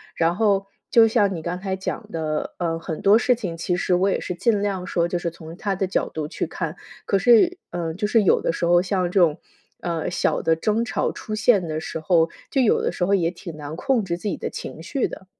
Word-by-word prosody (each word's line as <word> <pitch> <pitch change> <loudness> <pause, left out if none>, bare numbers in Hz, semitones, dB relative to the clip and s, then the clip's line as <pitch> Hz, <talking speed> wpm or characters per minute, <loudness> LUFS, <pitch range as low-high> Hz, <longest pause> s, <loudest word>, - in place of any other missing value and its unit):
然 165 0 +2
后 200 -1 +2 0.2
就 230 -1 +7
像 205 -3 +2
你 165 - -5
刚 175 +2 -4
才 190 0 -2
讲 210 +3 -5
的， 155 -2 -3
呃， 165 -2 -1
很 160 -1 -5
多 200 +2 +6
事 250 +1 +3
情 195 -8 -5
其 170 +2 -1
实 180 - 0
我 185 +2 +3
也 - - 0
是 - - -4
尽 205 +3 +1
量 195 -3 -2
说， 170 -2 +1
就 175 - -1
是 175 - -2
从 165 0 -11
他 200 -1 -1
的 190 - 0
角 190 - -1
度 155 -1 -4
去 - - -3
看， - - -4 0.3
可 200 - +2
是 240 - +5
嗯， 165 -2 -3
就 210 - -1
是 220 0 +3
有 190 - +4
的 - - +1
时 170 - -2
候 175 +1 +5
像 185 -2 0
这 190 - +2
种， 160 -2 +3 0.4
呃， 170 0 -2
小 175 - 0
的 165 - +3
争 215 +6 +1
吵 220 - -1
出 215 - -7
现 215 -3 +3
的 155 -1 -3
时 160 0 -5
候， 165 0 +3 0.2
就 275 - 0
有 235 - +3
的 - - 0
时 180 - -1
候 195 - +1
也 170 -3 +1
挺 170 -2 -9
难 150 0 -7
控 255 +1 +1
制 170 -3 -2
自 - - -17
己 190 - -1
的 - - -4
情 160 - -8
绪 270 - -1
的。 190 - -10
180 Hz, 270 characters per minute, -23 LUFS, 165-205 Hz, 0.4 s, 就